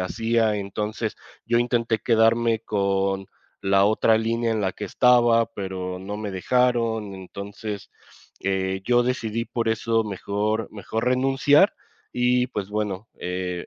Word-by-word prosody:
hacía. 115 +2 +1
Entonces 105 +2 -3 0.3
yo 120 0 +2
intenté 120 -2 +1
quedarme 115 0 +3
con 100 -2 0 0.3
la 95 0 +3
otra 110 +1 +3
línea 115 +1 0
en 110 - -1
la 95 -2 0
que - - -6
estaba, 120 -2 +4
pero 95 -4 -5
no 100 +2 -5
me 105 -1 -4
dejaron 115 0 +1
entonces, 100 +2 -7 0.5
eh, 95 0 -1
yo 120 0 +4
decidí 115 -2 -1
por 115 -1 -2
eso 115 0 +1
mejor 105 +2 -2
mejor 110 +2 -4
renunciar 135 - +4 0.4
y 125 0 +2
pues 105 -5 -5
bueno, 105 0 -3
eh, 90 -1 -3
110 Hz, 130 wpm, -24 LUFS, 100-115 Hz, 0.5 s, estaba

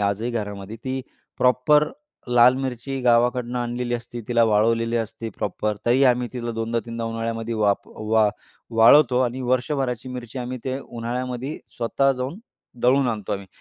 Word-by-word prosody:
आजही 100 +4 0
घरामध्ये, 105 -2 -5
ती 130 0 -2 0.4
प्रॉपर 150 +4 +4 0.4
लाल 120 +1 +6
मिरची 130 +1 -4
गावाकडनं 125 0 +2
आणलेली 120 0 -2
असते. 120 0 -6
तिला 120 -1 +3
वाळवलेली 115 +2 +2
असते 115 0 -4
प्रॉपर. 105 +1 -2
तरी 125 +3 +4
आम्ही 125 -1 +3
तिला 120 -2 -4
दोनदा, 115 +1 -1
तीनदा 115 0 -4
उन्हाळ्यामध्ये 115 0 -3
वाप 105 -2 +1
वा 110 0 +1 0.5
वाळवतो. 125 +2 +7
आणि 125 +1 -2
वर्षभराची 130 -1 -1
मिरची 125 0 -7
आम्ही 125 +1 -4
ते 130 0 -2
उन्हाळ्यामध्ये 125 +2 -4 0.2
स्वतः 135 +4 +2
जाऊन 130 +7 -4 0.4
दळून 130 +2 +4
आणतो 105 -4 -3
आम्ही. 100 -1 -4
120 Hz, 145 wpm, -23 LUFS, 115-125 Hz, 0.5 s, वाळवतो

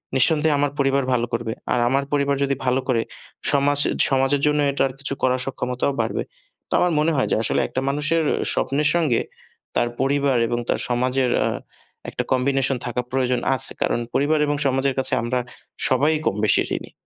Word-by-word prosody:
নিঃসন্দেহে 150 +3 +3
আমার 145 0 +1
পরিবার 135 0 +2
ভালো 120 -1 +1
করবে। 115 -1 -2 0.2
আর 125 - +1
আমার 135 +1 +1
পরিবার 140 -1 +2
যদি 140 0 0
ভালো 125 +1 +2
করে 120 -3 +2 0.5
সমাজ 145 0 +2 0.3
সমাজের 135 +1 +2
জন্য 150 0 +2
এটার 135 -1 0
কিছু 140 0 -3
করার 130 0 +2
সক্ষমতাও 125 +1 -2
বাড়বে। - - -2 0.5
তো - - -4
আমার 180 - +2
মনে 155 +2 +2
হয় 130 - +1
যে - - +3
আসলে - - +1
একটা 130 - -3
মানুষের 155 +3 0 0.3
স্বপ্নের 145 +2 +1
সঙ্গে 150 -9 +2 0.5
তার 120 - +2
পরিবার 140 -1 +2
এবং 120 +1 -1
তার - - +1
সমাজের 125 +1 +1
আ - - +1 0.6
একটা - - -3
কম্বিনেশন 135 0 +1
থাকা 125 0 -2
প্রয়োজন 125 -1 +1 0.2
আছে। - - +3
কারণ - - +1
পরিবার 150 +2 +2
এবং 145 - +1
সমাজের 135 0 +1
কাছে 130 - -2
আমরা 125 +2 -1 0.5
সবাই 145 +5 +3
কম-বেশি 105 +1 +2 0.2
ঋণী - - -10
135 Hz, 170 wpm, -22 LUFS, 125-145 Hz, 0.6 s, নিঃসন্দেহে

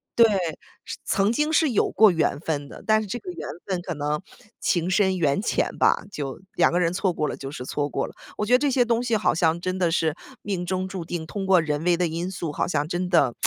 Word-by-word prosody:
俩 235 - +7
之 - - +4
间 195 - +1
是 170 -2 -1
对， - - -14 0.3
是 - - -6
曾 200 +2 +2
经 300 +4 +1
是 315 -3 +3
有 215 - +2
过 220 -1 +6
缘 155 -3 0
分 145 -3 -3
的， - - -11
但 215 0 +4
是 210 - -6
这 240 - -3
个 365 - -9
缘 350 - -7 0.2
分 185 -3 -2
可 175 -1 -4
能 150 +2 -2 0.4
情 175 0 +1
深 190 0 +2
缘 150 +2 +1
浅 - - 0
吧， - - +3
就 140 -6 -5
两 170 - +3
个 175 - +1
人 170 0 +1
错 190 0 +1
过 150 -3 -1
了 - - -3
就 135 - -7
是 125 -4 -7
错 145 +1 -2
过 135 - -1
了。 - - -12 0.2
我 210 - -1
觉 245 - +1
得 250 - +7
这 290 0 +2
些 245 -1 +3
东 235 0 +1
西 230 -3 +1
好 215 - +2
像 165 0 +2
真 185 +1 -2
的 175 -3 +1
是 160 -1 +1 0.3
命 190 -4 -2
中 185 0 -1
注 185 -3 -5
定， 165 -1 -4
通 195 +3 -4
过 185 -2 +6
人 150 0 -2
为 175 -1 +3
的 180 -1 +1
因 170 +3 -3
素， 170 -4 -4
好 - - 0
像 155 -3 0
真 180 +1 -2
的 165 -9 +3
180 Hz, 295 characters per minute, -24 LUFS, 160-205 Hz, 0.4 s, 俩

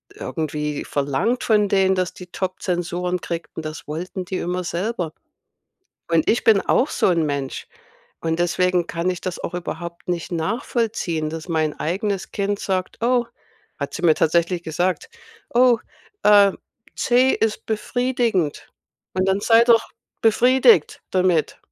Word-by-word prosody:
irgendwie 150 - -3
verlangt 145 - -1
von 210 -2 +3
denen, 190 -1 +3
dass 185 -1 -1
die 180 - -11
Top-Zensuren 180 -1 -2
kriegten. 165 -1 -5
Das 155 -1 -7
wollten 180 +5 -5
die 185 +1 -3
immer 180 +1 -2
selber.” 175 -1 -3 1.0
Und 165 -2 +3
ich 230 - +2
bin 215 -3 +5
auch 270 - +2
so - - +1
'n 170 -3 +2
Mensch 140 -2 -3 0.5
und 160 0 -1
deswegen 180 0 +1
kann 170 +2 -1
ich 180 - -3
das 185 -2 -4
auch - - -5
überhaupt 170 0 -6
nicht 175 0 -3
nachvollziehen, 190 - -1
dass 160 0 -6
mein 155 -2 -1
eigenes 195 +4 -2
Kind 200 0 -1
sagt: 185 -1 -2
„Oh” 245 0 +2 0.5
hat - - -4
sie - - -5
mir 160 -3 +5
tatsächlich 170 +2 +1
gesagt: 175 - -1 0.5
„Oh, 245 -1 +5 0.5
äh, 205 -1 +7 0.4
C 250 +1 +3
ist 220 -1 -1
befriedigend 225 - -1 0.4
und 185 0 +1
dann 190 +1 +2
sei 230 +2 +6
doch 230 -2 +4 0.3
befriedigt 255 - +4
damit.” 180 -4 +1
180 Hz, 140 wpm, -22 LUFS, 165-215 Hz, 1.0 s, äh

